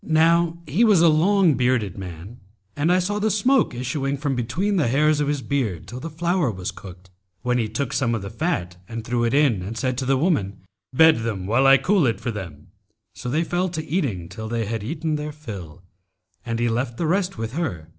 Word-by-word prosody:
Now 165 Hz, +1 st, +3 dB
he 160 Hz, +10 st, +1 dB
was 210 Hz, -6 st, +5 dB
a -, -, +7 dB
long 175 Hz, +2 st, +4 dB
bearded 125 Hz, -6 st, +1 dB
man[FN#278] 95 Hz, +4 st, -9 dB, 0.4 s
and 150 Hz, +4 st, +1 dB
I 180 Hz, -, +4 dB
saw 200 Hz, +3 st, -1 dB
the 215 Hz, +1 st, +1 dB
smoke 215 Hz, -, +2 dB
issuing 135 Hz, +3 st, -2 dB
from 140 Hz, -1 st, -1 dB
between 175 Hz, -, -1 dB
the 155 Hz, -, +2 dB
hairs 150 Hz, +4 st, +3 dB
of 145 Hz, -, 0 dB
his 145 Hz, -2 st, -1 dB
beard 110 Hz, -, -2 dB
till 120 Hz, +6 st, -7 dB
the 165 Hz, -, -6 dB
flour 170 Hz, -1 st, 0 dB
was 95 Hz, -4 st, -4 dB
cooked, 90 Hz, -1 st, -13 dB, 0.3 s
when 125 Hz, 0 st, +1 dB
he 110 Hz, -2 st, -1 dB
took 125 Hz, +4 st, -3 dB
some 120 Hz, -3 st, +1 dB
of 105 Hz, -, -4 dB
the 100 Hz, -, -6 dB
fat 90 Hz, -, -2 dB
and 115 Hz, -1 st, -6 dB
threw 120 Hz, 0 st, 0 dB
it 115 Hz, -, +1 dB
in 140 Hz, -10 st, +3 dB
and 105 Hz, +5 st, -6 dB
said 130 Hz, 0 st, -1 dB
to 130 Hz, -, -2 dB
the 135 Hz, 0 st, +3 dB
woman, 115 Hz, -, 0 dB, 0.3 s
'Bed 160 Hz, +4 st, +6 dB
them 110 Hz, -5 st, -3 dB
while 120 Hz, +7 st, +3 dB
I 135 Hz, 0 st, +8 dB
cool 185 Hz, -5 st, +2 dB
it 115 Hz, -, -1 dB
for 120 Hz, -, -3 dB
them.' 90 Hz, -6 st, -8 dB, 0.4 s
So 125 Hz, -, -6 dB
they 155 Hz, +6 st, +1 dB
fell 175 Hz, +2 st, -1 dB
to 160 Hz, -2 st, -5 dB
eating 130 Hz, -, -2 dB
till 110 Hz, +5 st, -7 dB
they 115 Hz, -1 st, -1 dB
had 110 Hz, 0 st, -3 dB
eaten 155 Hz, +5 st, -2 dB
their 150 Hz, 0 st, -4 dB
fill, 100 Hz, -, -9 dB, 0.6 s
and 115 Hz, 0 st, -3 dB
he 120 Hz, +1 st, +1 dB
left 120 Hz, +1 st, -2 dB
the 170 Hz, -, -1 dB
rest 185 Hz, +3 st, 0 dB
with 115 Hz, +1 st, -4 dB
her. 125 Hz, -, -3 dB
130 Hz, 225 wpm, -23 LUFS, 110-160 Hz, 0.6 s, I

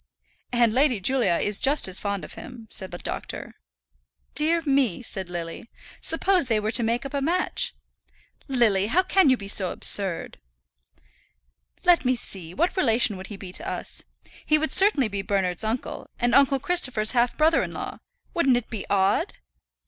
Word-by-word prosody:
"And 240 Hz, -2 st, +3 dB
Lady 260 Hz, -3 st, +2 dB
Julia 245 Hz, 0 st, +1 dB
is 205 Hz, +3 st, 0 dB
just 280 Hz, -2 st, +3 dB
as 185 Hz, 0 st, -3 dB
fond 200 Hz, -2 st, -3 dB
of -, -, -12 dB
him," 225 Hz, 0 st, -11 dB
said 190 Hz, -2 st, +3 dB
the 175 Hz, -, -7 dB
doctor. -, -, -6 dB, 0.8 s
"Dear 325 Hz, +3 st, +1 dB
me!" 270 Hz, -, +1 dB
said 190 Hz, -5 st, -5 dB
Lily. 170 Hz, +5 st, -7 dB, 0.3 s
"Suppose 355 Hz, -1 st, +1 dB
they 225 Hz, -3 st, +1 dB
were 210 Hz, +1 st, -2 dB
to 240 Hz, -, +3 dB
make 235 Hz, +3 st, -1 dB
up 275 Hz, -, -7 dB
a 280 Hz, -, -1 dB
match!" 345 Hz, +6 st, 0 dB, 0.7 s
"Lily, 225 Hz, -7 st, +2 dB
how 345 Hz, +11 st, +2 dB
can 375 Hz, -4 st, +3 dB
you 260 Hz, -, +4 dB
be 200 Hz, -, -9 dB
so 190 Hz, -2 st, +2 dB
absurd?" 190 Hz, -, -1 dB, 1.4 s
"Let 350 Hz, -3 st, +4 dB
me 255 Hz, 0 st, +2 dB
see; 190 Hz, -8 st, -6 dB
what 340 Hz, +4 st, 0 dB
relation 230 Hz, -, +2 dB
would 190 Hz, 0 st, -8 dB
he 205 Hz, -, -8 dB
be 190 Hz, -2 st, -9 dB
to 345 Hz, -, -2 dB
us? -, -, -5 dB, 0.4 s
He 305 Hz, -, +3 dB
would 310 Hz, -1 st, -2 dB
certainly 375 Hz, -, +5 dB
be 200 Hz, -1 st, -4 dB
Bernard's 195 Hz, -2 st, -1 dB
uncle, 225 Hz, +3 st, -4 dB
and 240 Hz, -1 st, +1 dB
uncle 275 Hz, +1 st, +4 dB
Christopher's 255 Hz, -10 st, +2 dB
half 240 Hz, -1 st, +1 dB
brother 315 Hz, +1 st, +3 dB
in -, -, -4 dB
law. -, -, -7 dB, 0.3 s
Wouldn't 275 Hz, -8 st, +3 dB
it 245 Hz, -, -6 dB
be 220 Hz, -4 st, -5 dB
odd?" 200 Hz, -, +1 dB
240 Hz, 175 wpm, -24 LUFS, 200-285 Hz, 1.4 s, certainly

